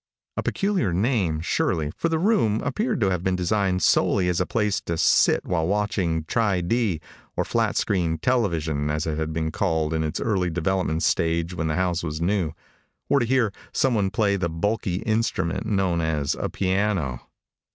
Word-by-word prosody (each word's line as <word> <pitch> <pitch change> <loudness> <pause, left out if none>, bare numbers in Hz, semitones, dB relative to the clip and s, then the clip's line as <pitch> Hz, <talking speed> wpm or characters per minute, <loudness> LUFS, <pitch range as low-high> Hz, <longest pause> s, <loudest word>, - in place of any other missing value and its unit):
A - - -1
peculiar 195 - 0
name, 95 - +1
surely, 80 -2 0
for 165 - -1
the 165 - +1
room 165 - +2
appeared 220 - -1
to 95 -2 +3
have 90 -1 -1
been 95 -1 +1
designed 90 0 0
solely 90 -3 +3
as 90 0 +1
a 90 - -1
place 105 -3 0
to 85 - -3
sit - - +3
while 80 -2 0
watching 95 -5 0
Tri 100 +1 +1
D 100 -2 0 0.4
or - - +1
flat - - 0
screen 85 -5 0
television, 80 - 0
as 75 +1 -1
it 80 -1 -2
had 80 0 -2
been 80 0 -2
called 80 -3 0
in 80 0 0
its 75 -1 -2
early 95 -5 0
developmental 85 -1 -1
stage 85 +1 +1
when 80 -2 -2
the 75 - -1
house 90 -1 0
was 80 -2 -4
new 85 -2 0 0.6
or 140 - +4
to 120 - 0
hear 120 -5 +2 0.2
someone 110 -7 +2
play 100 0 +1
the 85 -2 -1
bulky 95 +3 -1
instrument 110 -3 -1
known 95 -5 +1
as 75 -3 0
a - - -3
piano. 95 -9 0
90 Hz, 180 wpm, -24 LUFS, 80-105 Hz, 0.6 s, or